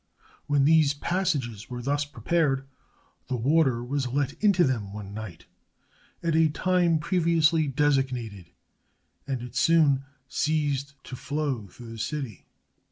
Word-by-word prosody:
When 145 -2 +3
these 155 -2 +4
passages 140 - -2
were 120 -1 -6
thus 145 +2 0
prepared, 145 -2 0 0.6
the 130 - -2
water 130 -1 +2
was 135 +1 -2
let 135 +2 -1
into 195 -4 +5
them 115 -9 -1
one 100 -1 -7
night, 95 -6 -8 0.8
at 165 -2 +1
a 160 -1 +4
time 175 +1 +2
previously 160 -1 +2
designated, 130 - 0 0.8
and 130 -3 -3
it 125 - -9
soon 150 -5 +4 0.2
ceased 140 -3 -1
to 130 - -8
flow 140 -5 -3
through 115 +4 -12
the 115 - -8
city. 135 - -5
140 Hz, 130 wpm, -26 LUFS, 120-155 Hz, 0.8 s, into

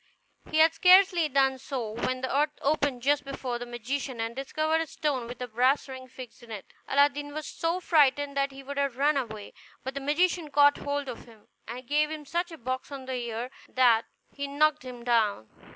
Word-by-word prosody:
He - - -1
had 320 +1 +6
scarcely 360 -1 +5
done 270 -1 +2
so 250 -5 -4
when 255 +3 -2
the 260 +1 -2
earth 295 +1 +1
opened 280 -4 0
just 290 +1 +2
before 265 -3 -4
the 245 - -6
magician, 245 +2 -4
and 225 +1 -3
discovered 310 +4 0
a 325 - -3
stone 275 -6 -2
with 245 0 -8
a - - -5
brass 250 +6 +2
ring 260 -1 -9
fixed 255 -1 -11
in 235 - -15
it. 210 -3 -7 0.2
Aladdin 290 +1 +2
was 310 -1 -4
so 335 +2 -2
frightened 290 -4 +3
that 275 0 +1
he 270 0 -11
would 280 +1 -7
have 280 -3 -1
run 290 +2 +3
away, 215 -6 -4 0.3
but 265 - -4
the 275 - -4
magician 325 +3 +1
caught 285 0 +5
hold 285 0 -3
of 245 -3 -7
him, 225 -3 -19 0.2
and 245 +3 -7
gave 300 +3 +1
him 310 -1 -6
such 345 +4 -2
a 325 - -9
box 255 +2 -4
on 275 -2 -7
the 260 - -4
ear 240 0 -4 0.2
that 240 -3 +4 0.3
he 280 0 -4
knocked 305 +2 +2
him 250 -2 -9
down. 220 - +1
275 Hz, 210 wpm, -28 LUFS, 245-295 Hz, 0.3 s, had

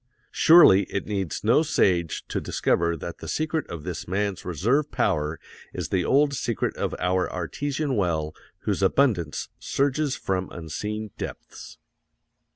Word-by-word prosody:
Surely, 160 - +7
it 100 - -2
needs 95 -5 -3
no 115 +8 +4
sage 90 - +1
to - - -3
discover 85 0 0
that 85 +3 -7
the - - -8
secret 155 -1 -2
of 85 -3 -7
this - - -5
man's 100 +1 -2
reserve 115 - 0
power 75 +1 0 0.4
is - - -3
the 90 -2 +1
old 140 +5 +3
secret 120 -4 -2
of - - -2
our 90 +1 0
artesian 140 - -2
well 80 -6 0 0.3
whose - - -1
abundance 100 - +1
surges 140 +1 0
from 95 -1 -2
unseen 105 +6 -5
depths. - - -8
100 Hz, 140 wpm, -25 LUFS, 85-140 Hz, 0.4 s, Surely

